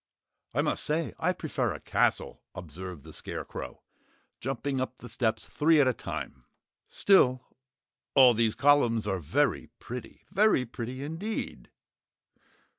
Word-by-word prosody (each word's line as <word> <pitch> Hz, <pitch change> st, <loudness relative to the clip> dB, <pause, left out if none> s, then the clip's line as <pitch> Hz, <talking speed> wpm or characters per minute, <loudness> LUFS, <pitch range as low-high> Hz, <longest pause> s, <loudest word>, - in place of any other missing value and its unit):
"I -, -, +2 dB
must -, -, 0 dB
say 155 Hz, +2 st, -1 dB
I 180 Hz, -, +2 dB
prefer 165 Hz, -4 st, -2 dB
a -, -, -8 dB
castle," -, -, 0 dB
observed 90 Hz, -2 st, -8 dB
the 80 Hz, 0 st, -12 dB
Scarecrow, -, -, -7 dB, 0.6 s
jumping 135 Hz, +1 st, -2 dB
up 130 Hz, -1 st, -4 dB
the 125 Hz, -, -10 dB
steps 110 Hz, -1 st, -1 dB
three 155 Hz, +1 st, +3 dB
at 140 Hz, -, +5 dB
a 130 Hz, -, +3 dB
time. -, -, -6 dB, 0.4 s
"Still, 130 Hz, -10 st, +4 dB, 0.7 s
all 130 Hz, -2 st, +8 dB
these 115 Hz, -1 st, +1 dB
columns 130 Hz, -6 st, +4 dB
are 95 Hz, -2 st, -1 dB
very 105 Hz, -, 0 dB
pretty. 125 Hz, -1 st, -9 dB
Very 210 Hz, -11 st, +3 dB
pretty 125 Hz, +3 st, -6 dB
indeed!" 165 Hz, +9 st, -5 dB
130 Hz, 130 wpm, -29 LUFS, 110-145 Hz, 0.7 s, all